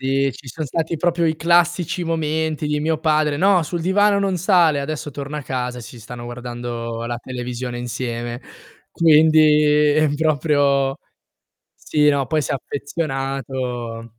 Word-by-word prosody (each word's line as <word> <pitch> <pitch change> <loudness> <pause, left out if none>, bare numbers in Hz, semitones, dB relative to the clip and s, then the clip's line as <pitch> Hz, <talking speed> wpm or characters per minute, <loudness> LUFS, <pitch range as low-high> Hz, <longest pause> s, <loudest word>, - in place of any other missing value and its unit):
Sì, 135 +1 +1
ci 135 +3 -14
son 155 +6 -5
stati 160 +4 -2
proprio 170 +1 0
i 160 - +1
classici 175 +1 +1
momenti 160 -1 -1
di 150 0 0
mio 155 +1 0
padre: 155 -2 +1
"No, 190 +2 +4
sul 170 +2 -4
divano 200 +4 +3
non 195 -2 0
sale", 175 -4 +3
adesso 150 +1 -4
torna 145 +2 -6
a - - -6
casa 125 -2 -3
e - - -8
si 120 +2 -11
stanno 120 +2 -9
guardando 120 -1 -5
la 120 0 -3
televisione 125 -1 -5
insieme. 120 0 -4 0.5
Quindi 155 -1 +5 0.3
è 155 0 +3
proprio 145 -3 +1 0.8
sì, 150 -1 +1
no, 140 -2 0
poi 155 +1 0
si - - -4
è - - +1
affezionato. 135 -5 -4
145 Hz, 150 wpm, -20 LUFS, 125-160 Hz, 0.8 s, Quindi